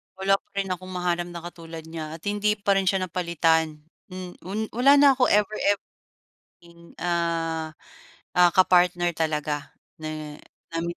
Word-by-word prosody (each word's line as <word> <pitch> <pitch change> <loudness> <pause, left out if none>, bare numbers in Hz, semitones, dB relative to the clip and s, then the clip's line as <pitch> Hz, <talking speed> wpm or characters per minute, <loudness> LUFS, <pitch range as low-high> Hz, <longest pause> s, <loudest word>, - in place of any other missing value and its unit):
Wala 195 +1 +2
pa - - -43
rin 195 -1 -1
akong 185 +1 -5
mahanap 175 -1 -1
na 170 -1 -8
katulad 165 -2 -9
niya, 160 -1 -7
at 165 - -14
hindi 205 +1 +1
pa 200 -1 +1
rin 195 -1 0
siya 190 0 +2
napalitan. 160 -3 0 0.2
Mm, 185 -1 -7 0.2
un 205 +3 -3
wala 275 +4 +5
na 285 -1 +7
ako 255 -1 +3
ever 210 +1 +2 0.2
ev 200 - -8 0.8
thing, 170 0 -17
ah, 165 -2 -1 0.6
ah, 180 -1 +6
ka-partner 175 -1 +3
talaga 150 -2 -2 0.3
ne 155 -1 -6 0.3
nam 165 0 -1
175 Hz, 155 wpm, -25 LUFS, 165-195 Hz, 0.8 s, na